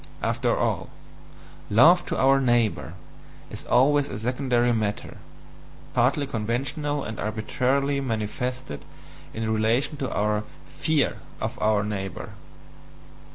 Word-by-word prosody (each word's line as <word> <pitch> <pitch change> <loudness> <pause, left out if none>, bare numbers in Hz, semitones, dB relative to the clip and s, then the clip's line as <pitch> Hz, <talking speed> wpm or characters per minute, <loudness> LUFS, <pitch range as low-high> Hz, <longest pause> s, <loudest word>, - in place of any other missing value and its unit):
After - - +1
all, - - -1 0.8
"love 160 - +6
to - - -2
our 135 +1 +4
neighbour" 120 -4 +1 0.6
is - - -8
always 140 +3 +3
a 100 - -5
secondary 125 +1 +1
matter, 105 -2 -2 0.8
partly 130 +4 +2
conventional 140 +5 -2
and 110 0 -6
arbitrarily 130 +6 0
manifested 120 - -3 0.5
in 110 0 -2
relation 120 +7 +1
to 135 -2 -3
our 105 0 0 0.2
FEAR 155 -3 0 0.2
OF - - -3
OUR 105 -1 +3
NEIGHBOUR. 95 -3 -4
120 Hz, 110 wpm, -25 LUFS, 110-140 Hz, 0.8 s, love